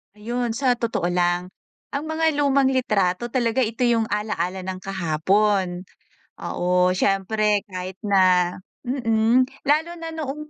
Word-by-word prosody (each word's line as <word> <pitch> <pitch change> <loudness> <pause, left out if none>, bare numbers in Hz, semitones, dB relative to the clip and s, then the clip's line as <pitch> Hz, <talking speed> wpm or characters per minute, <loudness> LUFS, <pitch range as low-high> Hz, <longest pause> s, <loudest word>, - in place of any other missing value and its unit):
Ayon. 235 +3 -3
Sa 250 +2 +1
totoo 230 -7 -2
lang, 175 0 0 0.5
ang 280 - -2
mga 315 -1 0
lumang 280 -2 +3
litrato 230 -4 0
talaga, 245 0 +1
ito 230 +2 0
yung 230 -1 +2
ala-ala 190 -3 -2
ng 185 0 -5
kahapon. 190 +1 0 0.5
Oo, 180 0 +1
siyempre 205 +2 +1
kahit 185 0 -6
na 185 -4 +3 0.2
mm, 240 -1 +2 0.2
lalo 315 +3 +2
na 330 - -5
noong 300 -1 -6
215 Hz, 125 wpm, -23 LUFS, 185-255 Hz, 0.5 s, lumang